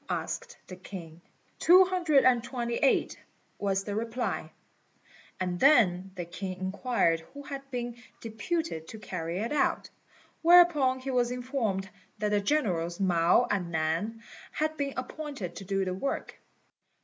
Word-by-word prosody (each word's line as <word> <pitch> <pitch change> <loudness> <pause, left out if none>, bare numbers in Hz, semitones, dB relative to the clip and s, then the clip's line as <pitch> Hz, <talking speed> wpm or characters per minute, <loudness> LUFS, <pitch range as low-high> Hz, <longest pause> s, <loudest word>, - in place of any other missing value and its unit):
asked 480 0 -4
the 185 - -9
king. 175 -3 -10 0.4
"Two 365 +3 +7
hundred 345 -7 +3
and 245 -2 +4
twenty 240 -1 -3
eight," 275 - +2 0.4
was 195 -1 0
the 205 - -4
reply; 230 +3 -3 0.9
and 180 -1 -2
then 195 -10 +4
the 175 -2 -4
king 185 +2 -6
inquired 190 -3 +1
who 285 +13 -12
had 275 -1 -7
been 240 -2 -4 0.2
deputed 230 - -3
to 220 - -9
carry 175 -4 -4
it 225 +6 -2
out; 295 - 0 0.5
whereupon 335 -6 +6
he 265 +1 -4
was 245 -1 +2
informed 245 -6 -2 0.3
that 210 - -1
the 205 0 +2
generals 185 - 0
Mao 175 +4 +4
and 190 -4 -1
Nan 170 +8 -1 0.3
had 310 0 -1
been 280 -2 -3
appointed 255 - -5
to 195 - -8
do 195 0 0
the 185 - -2
work. 235 +9 -4
225 Hz, 145 wpm, -29 LUFS, 185-275 Hz, 0.9 s, Two